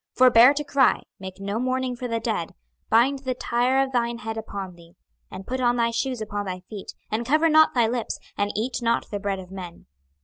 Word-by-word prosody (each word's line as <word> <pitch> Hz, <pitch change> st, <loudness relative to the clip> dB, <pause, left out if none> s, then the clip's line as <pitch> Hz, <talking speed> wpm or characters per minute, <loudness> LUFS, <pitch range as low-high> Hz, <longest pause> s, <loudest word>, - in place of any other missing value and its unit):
26:024:017 -, -, -31 dB
Forbear 250 Hz, +1 st, +7 dB
to 295 Hz, -, -1 dB
cry, 275 Hz, -2 st, +2 dB, 0.2 s
make 190 Hz, 0 st, -8 dB
no 200 Hz, +2 st, -3 dB
mourning 255 Hz, 0 st, -1 dB
for 250 Hz, +1 st, -5 dB
the 230 Hz, -1 st, -1 dB
dead, 220 Hz, -7 st, -3 dB, 0.3 s
bind 260 Hz, +5 st, +3 dB
the 260 Hz, -2 st, -3 dB
tire 250 Hz, +2 st, +1 dB
of 270 Hz, -, -5 dB
thine 235 Hz, -2 st, 0 dB
head 225 Hz, -1 st, -5 dB
upon 200 Hz, -4 st, -6 dB
thee, 170 Hz, -1 st, -18 dB, 0.3 s
and 190 Hz, +1 st, -9 dB
put 255 Hz, +3 st, -3 dB
on 240 Hz, -1 st, +3 dB
thy 235 Hz, 0 st, +2 dB
shoes 245 Hz, +1 st, -2 dB
upon 205 Hz, -1 st, -4 dB
thy 185 Hz, 0 st, -5 dB
feet, 200 Hz, +2 st, -9 dB, 0.2 s
and 220 Hz, +2 st, -1 dB
cover 305 Hz, +6 st, +3 dB
not 315 Hz, -2 st, +5 dB
thy 240 Hz, -2 st, +4 dB
lips, 235 Hz, 0 st, -2 dB, 0.2 s
and 205 Hz, 0 st, -1 dB
eat 240 Hz, +4 st, -2 dB
not 230 Hz, 0 st, 0 dB
the 205 Hz, -, -3 dB
bread 200 Hz, -1 st, -2 dB
of 185 Hz, -1 st, -10 dB
men. 180 Hz, -3 st, -9 dB
235 Hz, 225 wpm, -24 LUFS, 205-255 Hz, 0.3 s, Forbear